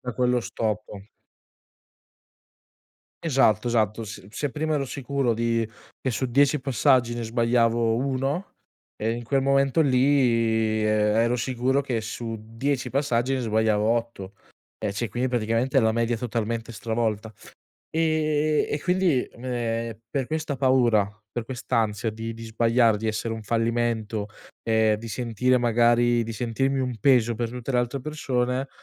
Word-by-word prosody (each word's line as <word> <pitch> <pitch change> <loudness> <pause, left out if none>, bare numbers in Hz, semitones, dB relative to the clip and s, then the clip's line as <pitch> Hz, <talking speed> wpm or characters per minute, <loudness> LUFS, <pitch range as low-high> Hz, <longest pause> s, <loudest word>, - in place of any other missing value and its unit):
da 125 -1 -5
quello 125 0 +2
stop. 105 -3 -4 2.2
Esatto, 130 -8 +3
esatto. 110 -1 +1
Se 100 -2 -9
se 145 +5 -3
prima 155 +2 -1
ero 140 -2 -1
sicuro 135 -2 -1
di 115 -1 0 0.3
che 130 - -1
su 130 - -2
10 140 +4 +3
passaggi, 130 -2 +2
ne 120 - -4
sbagliavo 115 0 +2
1, 135 +7 -2 0.4
e 110 +1 -1
in 120 0 -5
quel 135 +3 +1
momento 140 +2 +3
lì, 115 -5 +2
ero 110 +3 +2
sicuro 130 +3 0
che 125 -5 -2
su 115 +1 -5
10 125 +5 -2
passaggi 135 -2 0
ne 130 - -1
sbagliavo 110 -2 +1
8. 115 -4 -2 0.5
E 100 -2 -2
cioè, 110 0 -3
quindi 125 +3 -1
praticamente 120 +2 +1
la 110 -1 +2
media 115 0 0
totalmente 115 0 -3
stravolta. 110 0 -2 0.6
Ehm, 155 -1 +1
e 145 - -1
quindi, 180 -7 +2
ehm, 115 -2 -4
per 135 -2 -1
questa 155 0 -3
paura, 125 -6 +3 0.2
per 120 +1 -4
quest'ansia 115 -3 -1
di 115 +1 -5
di 115 0 -9
sbagliare, 115 0 +3
di 110 +2 -3
essere 110 +1 -2
un 110 - -6
fallimento, 115 -2 -1 0.4
ehm, 110 -1 +3
di 115 +2 -8
sentire 125 +2 +1
magari, 120 0 +3
di 115 - -5
sentirmi 125 +4 -1
un 125 -2 -2
peso 120 -1 +3
per 115 0 -2
tutte 125 +2 -5
le 125 - +4
altre 120 +3 -2
persone, 130 -2 -2
120 Hz, 145 wpm, -25 LUFS, 115-130 Hz, 2.2 s, le